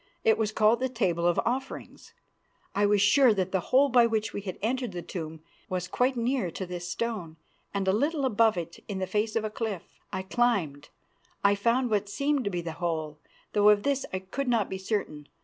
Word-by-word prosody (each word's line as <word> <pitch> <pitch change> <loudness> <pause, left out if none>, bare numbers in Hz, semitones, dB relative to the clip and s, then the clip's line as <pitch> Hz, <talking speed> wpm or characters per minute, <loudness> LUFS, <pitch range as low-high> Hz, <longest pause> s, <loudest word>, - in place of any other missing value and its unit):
It 220 - +5
was 215 -2 -1
called 215 +2 +3
the 260 0 0
Table 180 -8 0
of 175 - +2
Offerings. 265 +3 -4 0.6
I 205 0 +2
was 205 -1 +3
sure 250 +1 +5
that 190 -1 -1
the 190 - +1
hole 275 +2 +5
by 245 -3 +5
which 220 -1 -1
we 205 - -4
had 190 -3 -6
entered 245 0 -2
the 175 -1 -5
tomb 160 -3 -6 0.3
was 180 -1 -2
quite 255 +6 +1
near 240 -4 0
to 190 +3 -5
this 175 -1 -6
stone 180 -5 -3 0.3
and 200 -1 -2
a - - +5
little 285 +6 +1
above 225 -4 +3
it, 170 -1 -6
in 200 - -4
the 190 - -1
face 215 +3 -1
of 225 - +1
the 215 - -3
cliff. 215 -5 -3 0.3
I 190 - -3
climbed; 190 - 0 0.5
I 200 0 +5
found 235 +4 +1
what 205 -1 0
seemed 280 +4 0
to - - +1
be 175 -3 -2
the 170 -1 -5
hole, 155 -3 -2 0.3
though 210 0 +5
of 210 -1 +4
this 275 -1 +1
I 185 - -1
could 190 +9 -4
not 230 -5 +1
be 190 - -3
certain. 185 -7 -3
205 Hz, 215 wpm, -28 LUFS, 185-235 Hz, 0.6 s, It